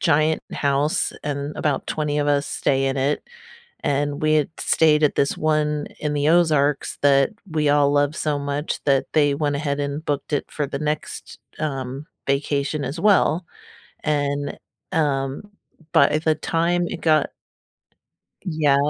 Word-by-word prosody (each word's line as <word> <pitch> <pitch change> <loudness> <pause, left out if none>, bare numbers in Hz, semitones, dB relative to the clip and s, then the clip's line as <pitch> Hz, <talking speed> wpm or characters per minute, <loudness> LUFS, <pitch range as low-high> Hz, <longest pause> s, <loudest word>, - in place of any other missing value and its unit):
giant 155 0 +2
house 140 +2 +1
and 145 0 -3
about 145 -3 -1
20 150 -1 -1
of 145 - 0
us 145 0 +2
stay 135 -1 0
in 135 +1 -1
it, 140 +2 0 0.6
and 145 +1 0
we 155 0 +3
had 150 -2 +2
stayed 155 -1 +3
at 150 - +4
this 140 - +1
one 150 -1 0
in 150 -1 -2
the 145 0 0
Ozarks 150 -4 +2
that 140 -1 +4 0.2
we 150 -2 +1
all 145 -1 +4
love 145 +1 +2
so 150 -2 -1
much 145 +2 -3
that 135 -2 +3
they 145 -2 +3
went 145 -1 0
ahead 140 0 -2
and 145 +2 -3
booked 145 +1 -2
it 145 - 0
for 150 - -2
the 140 0 -4
next, 150 0 -4 0.2
um, 135 -1 -4 0.2
vacation 140 +1 0
as 140 +6 -5
well, 185 -4 +3 0.6
and, 145 -1 -1 0.4
um, 135 -3 0 0.5
but 140 - +5
at 155 +1 0
the 155 -1 +3
time 170 +3 0
it - - -6
got 155 -3 +3 1.2
Yeah 155 -6 +2
145 Hz, 155 wpm, -22 LUFS, 140-155 Hz, 1.2 s, but